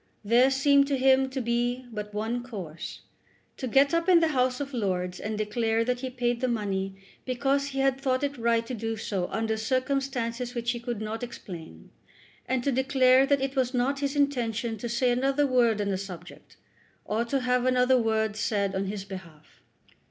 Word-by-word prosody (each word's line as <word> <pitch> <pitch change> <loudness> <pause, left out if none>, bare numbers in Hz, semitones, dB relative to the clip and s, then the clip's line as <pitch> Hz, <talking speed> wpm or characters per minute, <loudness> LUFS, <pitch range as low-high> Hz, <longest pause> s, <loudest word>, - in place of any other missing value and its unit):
There 240 +5 +5
seemed 280 +1 +4
to 280 -1 0
him 265 0 +4
to 265 0 -4
be 240 +2 -1
but 210 -1 -6
one 220 +4 -2
course, 190 -10 -7 0.6
to 260 - -4
get 275 +5 +4
up 335 +2 +1
in 350 -2 +7
the 325 -1 +2
House 255 -3 +1
of 285 -1 -5
Lords 185 -5 -2
and 215 0 -4
declare 225 +1 0
that 250 0 0
he 260 0 -4
paid 245 -1 -1
the 255 - +1
money 195 -4 -2 0.3
because 275 +2 0
he 270 -1 -4
had 270 0 +1
thought 260 -1 0
it 285 0 -1
right 230 0 +2
to 250 - -6
do 225 -1 -3
so 195 -4 -2
under 220 0 -1
circumstances 255 0 -1
which 235 0 0
he 240 - -4
could 235 -2 -4
not 220 +1 -4
explain, 170 - -9 0.6
and 255 -1 0
to 280 - +1
declare 265 0 +4
that 280 -1 +2
it 270 +1 -2
was 260 -1 0
not 265 +3 +1
his 280 0 -2
intention 240 -5 0
to 240 - -4
say 245 +1 +2
another 270 +4 +2
word 240 -5 +3
on 205 -1 -1
the 190 -1 -1
subject, 180 -3 -10 0.5
or 220 +2 0
to 270 +3 -1
have 250 0 +1
another 255 0 +4
word 220 -2 0
said 200 -2 0
on 195 0 -1
his 195 0 -5
behalf. 170 -6 -11
245 Hz, 195 wpm, -27 LUFS, 215-265 Hz, 0.6 s, in